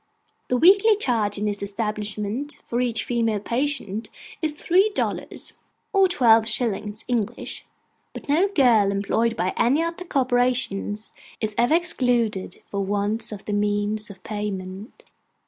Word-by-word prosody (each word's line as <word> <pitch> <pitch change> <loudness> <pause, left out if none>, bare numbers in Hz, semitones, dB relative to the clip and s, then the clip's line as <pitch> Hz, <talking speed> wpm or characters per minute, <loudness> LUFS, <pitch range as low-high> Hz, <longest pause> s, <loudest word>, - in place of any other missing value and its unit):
The 250 - +1
weekly 400 - +6
charge 225 - 0
in 210 - -2
this 205 -1 -2
establishment 210 +5 -3
for 240 +1 -2
each 235 -2 0
female 230 -3 0
patient 235 -3 -2 0.3
is 310 -2 0
three 370 +7 +3
dollars, - - -3 0.4
or 390 -1 +5
twelve 230 -10 +4
shillings 215 -2 -2
English; 235 -2 -3 0.4
but - - -10
no 320 +7 +3
girl 245 - +4
employed 205 +4 0
by 185 -1 -1
any 270 +7 +3
of 335 0 -3
the 360 - -7
corporations 245 - 0 0.3
is 215 -1 -2
ever 240 +7 +3
excluded 240 - 0
for 200 -1 -3
want 205 +3 -1
of 205 -2 -8
the 210 - -3
means 205 +1 0
of 195 -2 -13
payment. 205 0 -5
225 Hz, 140 wpm, -24 LUFS, 205-260 Hz, 0.4 s, weekly